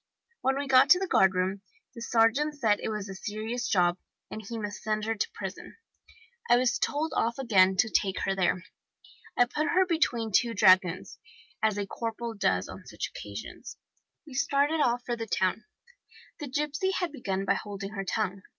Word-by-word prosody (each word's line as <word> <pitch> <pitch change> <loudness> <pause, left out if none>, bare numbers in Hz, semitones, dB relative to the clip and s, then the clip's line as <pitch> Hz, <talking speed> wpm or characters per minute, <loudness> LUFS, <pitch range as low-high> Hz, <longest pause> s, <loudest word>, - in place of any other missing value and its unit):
When 265 +1 +1
we 285 - -2
got 265 +1 +5
to 360 - +7
the 385 - -1
guardroom 190 - +2 0.3
the 235 - -10
sergeant 235 +7 +2
said 220 -7 +2
it - - -3
was 210 -2 -4
a 195 - -7
serious 220 +5 -4
job, 180 -3 +2 0.3
and 215 - -6
he 230 +1 -7
must 210 -2 -5
send 215 0 -1
her 225 - 0
to 215 - -2
prison. - - -7 0.7
I 240 - +6
was 245 -3 +1
told 310 +2 -1
off 230 +1 0
again 190 -7 +3
to 210 - +4
take 195 -3 0
her 195 - 0
there. 185 -1 0 0.7
I 245 - +6
put 300 +5 -2
her 375 +5 +3
between 240 -10 0
two 230 +3 +2
dragoons, 185 -3 +3 0.4
as 215 -2 +1
a 205 - -1
corporal 230 +2 -5
does 200 -3 0
on - - -10
such - - -5
occasions. - - -8 0.5
We 295 - -12
started 280 +3 +1
off 245 0 0
for 240 - -1
the 225 -1 -6
town. 190 +2 0 0.7
The 295 - -5
gipsy 300 +7 -1
had 355 -3 -2
begun 195 -9 -3
by - - +3
holding 200 -1 -6
her 195 -2 -4
tongue. 195 -1 -2
225 Hz, 185 wpm, -28 LUFS, 195-265 Hz, 0.7 s, to